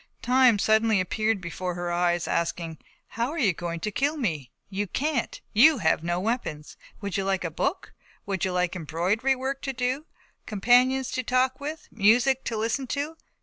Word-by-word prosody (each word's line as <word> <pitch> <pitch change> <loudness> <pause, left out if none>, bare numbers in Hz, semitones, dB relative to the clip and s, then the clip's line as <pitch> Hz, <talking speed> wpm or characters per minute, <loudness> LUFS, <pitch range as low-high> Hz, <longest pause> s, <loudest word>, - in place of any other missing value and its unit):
Time 250 -3 +5
suddenly 220 0 +3
appeared 215 +3 0
before 180 0 -4
her 175 0 -3
eyes 175 0 +1
asking: 165 -1 -2 0.3
"How 235 +2 -2
are 330 - -5
you 215 - +3
to 170 +4 -4
kill 285 +8 0
me? 160 - -2 0.2
You 200 +1 -3
can't, 280 - -2
you 290 +8 +7
have 160 -5 +1
no 175 +1 -1
weapons. 185 -8 -3 0.3
Would 200 -1 -3
you 195 - 0
like 190 -1 0
a 165 - -3
book? 375 - -2 0.3
Would 195 -3 -2
you 190 - +1
like 180 0 0
embroidery 185 - 0
work 265 +1 -3
to 270 - -3
do, 255 +5 -2 0.4
companions 250 +5 +3
to 255 - -1
talk 255 +2 +1
with, 305 +3 -6
music 240 +5 +3
to 225 - -2
listen 230 +5 -1
to? 290 +5 -3
220 Hz, 175 wpm, -26 LUFS, 180-260 Hz, 0.4 s, you